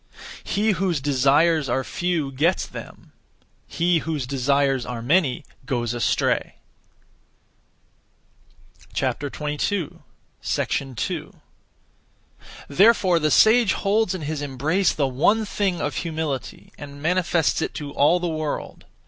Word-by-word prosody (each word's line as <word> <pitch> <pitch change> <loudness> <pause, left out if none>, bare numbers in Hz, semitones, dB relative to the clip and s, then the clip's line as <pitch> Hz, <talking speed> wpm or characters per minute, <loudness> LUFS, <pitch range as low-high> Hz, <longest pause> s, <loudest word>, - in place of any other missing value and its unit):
He 215 +2 +1
whose 185 -4 0
(desires) 145 +2 +2
are 130 +2 0
few 170 -3 -2
gets 160 +8 +1
them; - - -11 0.6
he 170 0 +1
whose 155 -4 -3
(desires) 135 0 +1
are 120 -1 -5
many 145 -1 +1 0.2
goes 120 -2 -1
astray. 120 -3 0 2.4
2. 150 +5 -2 2.7
Therefore 185 +1 +4
the 155 -1 +1
sage 220 - +5
holds 200 -1 +1
in 185 - -6
his 150 0 -4
embrace 145 +7 0
the 140 -3 0
one 205 - +2
thing 195 -4 -1
(of 145 -3 -3
humility), 160 -5 -4
and 145 -1 -9
manifests 170 0 +1
it - - -3
to 145 -2 -6
all 150 +5 +3
the 175 - -2
world. 155 -2 -4
155 Hz, 105 wpm, -23 LUFS, 140-180 Hz, 2.7 s, sage